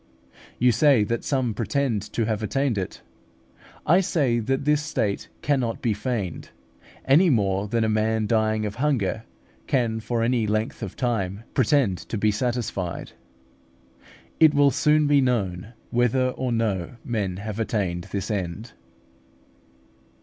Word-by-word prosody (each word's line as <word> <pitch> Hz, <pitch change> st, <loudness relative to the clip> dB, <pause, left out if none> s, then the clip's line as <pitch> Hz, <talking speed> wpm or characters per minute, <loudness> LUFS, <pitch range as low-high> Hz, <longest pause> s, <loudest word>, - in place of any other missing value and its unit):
You 125 Hz, +1 st, +4 dB
say 120 Hz, 0 st, +4 dB
that 115 Hz, +3 st, -2 dB
some 130 Hz, -5 st, 0 dB
pretend 115 Hz, +1 st, -1 dB
to 115 Hz, -, 0 dB
have 110 Hz, -1 st, -1 dB
attained 135 Hz, +3 st, 0 dB
it. 95 Hz, -2 st, -5 dB, 0.8 s
I 175 Hz, +5 st, +5 dB
say 140 Hz, -10 st, +1 dB
that 135 Hz, +4 st, -1 dB
this 150 Hz, 0 st, +3 dB
state 115 Hz, -10 st, -2 dB, 0.2 s
cannot 130 Hz, -6 st, 0 dB
be 115 Hz, -, 0 dB
feigned, 105 Hz, -5 st, -4 dB, 0.6 s
any 160 Hz, +7 st, +5 dB
more 100 Hz, -5 st, +1 dB
than 115 Hz, +2 st, 0 dB
a -, -, +2 dB
man 110 Hz, 0 st, +1 dB
dying 110 Hz, -1 st, +1 dB
of 105 Hz, -, -3 dB
hunger 115 Hz, -8 st, 0 dB, 0.4 s
can 115 Hz, -4 st, +1 dB
for 115 Hz, +1 st, -1 dB
any 115 Hz, -2 st, +1 dB
length 110 Hz, +3 st, -1 dB
of -, -, -5 dB
time 110 Hz, -5 st, -2 dB
pretend 130 Hz, -, +2 dB
to 115 Hz, -, -5 dB
be 105 Hz, +1 st, +2 dB
satisfied. 105 Hz, -6 st, -3 dB, 1.3 s
It 155 Hz, -2 st, +6 dB
will 145 Hz, -1 st, +5 dB
soon 150 Hz, +3 st, +3 dB
be 145 Hz, -1 st, +4 dB
known 110 Hz, -5 st, -1 dB, 0.2 s
whether 125 Hz, +2 st, +2 dB
or 130 Hz, 0 st, -3 dB
no 110 Hz, -4 st, -1 dB
men 100 Hz, -6 st, -2 dB
have 105 Hz, +2 st, -5 dB
attained 95 Hz, -6 st, -1 dB
this 100 Hz, +2 st, -4 dB
end. 100 Hz, +3 st, -4 dB
115 Hz, 140 wpm, -24 LUFS, 105-130 Hz, 1.3 s, It